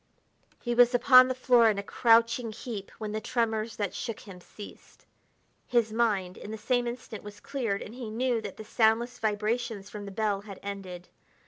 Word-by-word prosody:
He 240 Hz, -, -2 dB
was 245 Hz, +1 st, +5 dB
upon 255 Hz, +1 st, +7 dB
the 255 Hz, -, -2 dB
floor 245 Hz, -3 st, +5 dB
in 210 Hz, -, 0 dB
a 200 Hz, -, -3 dB
crouching 230 Hz, +1 st, +3 dB
heap 215 Hz, -2 st, -7 dB
when 215 Hz, -1 st, -5 dB
the 215 Hz, +1 st, -3 dB
tremors 225 Hz, -1 st, -1 dB
that 205 Hz, -3 st, -3 dB
shook 230 Hz, -3 st, -5 dB
him 185 Hz, -3 st, -12 dB
ceased. 205 Hz, +3 st, -13 dB, 0.6 s
His 230 Hz, -3 st, +1 dB
mind, 205 Hz, -6 st, 0 dB
in -, -, -9 dB
the 220 Hz, -, -5 dB
same 245 Hz, +2 st, 0 dB
instant, 235 Hz, -3 st, -7 dB
was 205 Hz, 0 st, -10 dB
cleared, 255 Hz, -8 st, -3 dB
and 210 Hz, -, -10 dB
he 245 Hz, -3 st, -7 dB
knew 240 Hz, +1 st, 0 dB
that 205 Hz, -3 st, -7 dB
the 220 Hz, -, -9 dB
soundless 230 Hz, +3 st, +1 dB
vibrations 215 Hz, -1 st, -2 dB
from 205 Hz, -1 st, -7 dB
the 200 Hz, -, -7 dB
bell 205 Hz, -1 st, -1 dB
had 200 Hz, -2 st, -10 dB
ended. 190 Hz, -3 st, -7 dB
220 Hz, 190 wpm, -28 LUFS, 205-240 Hz, 0.6 s, upon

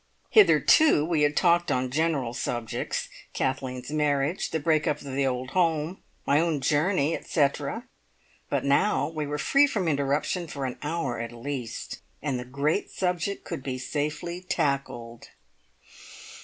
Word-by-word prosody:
Hitherto 315 Hz, -, +6 dB
we 165 Hz, -2 st, +1 dB
had 145 Hz, 0 st, +2 dB
talked 175 Hz, -1 st, +3 dB
on 125 Hz, 0 st, 0 dB
general 145 Hz, -5 st, 0 dB
subjects, 120 Hz, -2 st, -3 dB, 0.3 s
Kathleen's 130 Hz, 0 st, -2 dB
marriage, 150 Hz, +2 st, 0 dB
the 160 Hz, -, -1 dB
break 155 Hz, 0 st, +2 dB
up 150 Hz, -, +1 dB
of 140 Hz, -2 st, -7 dB
the 135 Hz, 0 st, +1 dB
old 130 Hz, 0 st, -3 dB
home, 165 Hz, -1 st, 0 dB, 0.2 s
my 145 Hz, -, +4 dB
own 165 Hz, -3 st, +1 dB
journey, 150 Hz, +3 st, +2 dB
etcetera, 140 Hz, -3 st, -1 dB, 0.6 s
but -, -, -1 dB
now 140 Hz, +9 st, +2 dB
we 155 Hz, -2 st, -4 dB
were 145 Hz, +1 st, -2 dB
free 280 Hz, -, +4 dB
from 205 Hz, -10 st, -1 dB
interruption 150 Hz, +4 st, 0 dB
for 140 Hz, -3 st, -4 dB
an 125 Hz, -, -5 dB
hour 150 Hz, -6 st, -2 dB
at 115 Hz, 0 st, -4 dB
least, 120 Hz, -1 st, -5 dB, 0.2 s
and 135 Hz, -4 st, -2 dB
the 125 Hz, -, -6 dB
great 140 Hz, +8 st, -1 dB
subject 180 Hz, +1 st, -2 dB
could -, -, -5 dB
be 130 Hz, -1 st, -4 dB
safely 150 Hz, +6 st, -3 dB
tackled. 135 Hz, -8 st, -2 dB
145 Hz, 145 wpm, -27 LUFS, 135-165 Hz, 0.6 s, Hitherto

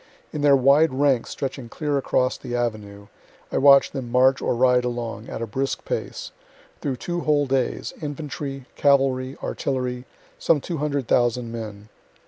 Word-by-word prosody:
In 150 Hz, -, -3 dB
their 145 Hz, -1 st, +6 dB
wide 140 Hz, +4 st, +4 dB
ranks 135 Hz, -3 st, +2 dB
stretching 135 Hz, -3 st, -5 dB
clear 150 Hz, +3 st, -2 dB
across 130 Hz, -2 st, +1 dB
the 120 Hz, -, -6 dB
Avenue, 105 Hz, -4 st, -3 dB, 0.5 s
I -, -, +1 dB
watch 140 Hz, 0 st, +6 dB
them 130 Hz, -4 st, -5 dB
march 130 Hz, +1 st, +4 dB
or -, -, 0 dB
ride 125 Hz, 0 st, +3 dB
along, 120 Hz, -1 st, -4 dB
at 115 Hz, -, -4 dB
a -, -, -1 dB
brisk 135 Hz, +5 st, -3 dB
pace, -, -, -4 dB, 0.5 s
through 135 Hz, -3 st, -2 dB
two 175 Hz, +7 st, -4 dB
whole 150 Hz, -3 st, +2 dB
days 130 Hz, -2 st, -1 dB
infantry, 145 Hz, -2 st, -5 dB
cavalry, 135 Hz, -2 st, +2 dB
artillery 125 Hz, -2 st, -3 dB, 0.3 s
some 160 Hz, -, +3 dB
200,000 130 Hz, -6 st, 0 dB
men. 110 Hz, -2 st, -7 dB
130 Hz, 145 wpm, -23 LUFS, 120-140 Hz, 0.5 s, their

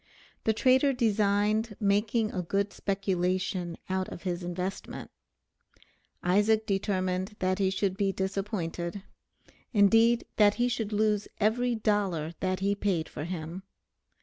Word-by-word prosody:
The 220 Hz, -, +3 dB
trader 260 Hz, +4 st, +4 dB
designed 215 Hz, -1 st, +1 dB
making 215 Hz, +2 st, +1 dB
a 185 Hz, -, -2 dB
good 200 Hz, +3 st, -1 dB
speculation 185 Hz, -2 st, -1 dB
out 190 Hz, 0 st, -1 dB
of -, -, -9 dB
his 180 Hz, -1 st, -2 dB
investment: 180 Hz, +2 st, -5 dB, 1.1 s
Isaac 210 Hz, +4 st, +3 dB
determined 190 Hz, -1 st, -1 dB
that 185 Hz, +1 st, 0 dB
he 195 Hz, -1 st, +3 dB
should 190 Hz, 0 st, -1 dB
be 200 Hz, -1 st, +1 dB
disappointed; 190 Hz, -2 st, -3 dB, 0.7 s
indeed 225 Hz, +3 st, +5 dB
that 205 Hz, -1 st, +5 dB
he 245 Hz, 0 st, +1 dB
should 225 Hz, -3 st, -2 dB
lose 210 Hz, -1 st, +1 dB
every 235 Hz, +3 st, +2 dB
dollar 195 Hz, -7 st, 0 dB
that 185 Hz, 0 st, -1 dB
he 200 Hz, +1 st, +2 dB
paid 195 Hz, -5 st, -1 dB
for 150 Hz, -, -6 dB
him. 170 Hz, +1 st, -5 dB
200 Hz, 125 wpm, -29 LUFS, 185-215 Hz, 1.1 s, indeed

